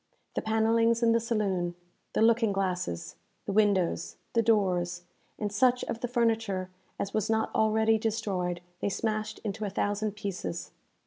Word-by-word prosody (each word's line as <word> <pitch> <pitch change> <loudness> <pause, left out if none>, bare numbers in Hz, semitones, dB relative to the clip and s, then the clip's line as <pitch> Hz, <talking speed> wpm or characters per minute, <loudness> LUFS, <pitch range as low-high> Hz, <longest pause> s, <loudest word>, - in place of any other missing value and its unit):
The - - -1
panellings 225 +1 +2
in 230 - +5
the 230 - +4
saloon, 200 -7 -1 0.4
the - - +3
looking 225 -1 +4
glasses, 175 - -2 0.3
the - - -2
windows, 195 -5 +2 0.2
the 230 - +4
doors, 185 -6 +1 0.3
and 210 -1 -2
such 250 +4 +3
of 230 - -3
the 245 - -2
furniture 225 -6 0 0.3
as 200 - -3
was 215 0 0
not 220 0 +1
already 220 0 +3
destroyed, 195 -6 -1 0.2
they - - 0
smashed 215 +1 -2
into 215 0 -3
a 205 - -1
thousand 205 +2 -1
pieces. 195 - -4
215 Hz, 150 wpm, -29 LUFS, 190-225 Hz, 0.4 s, in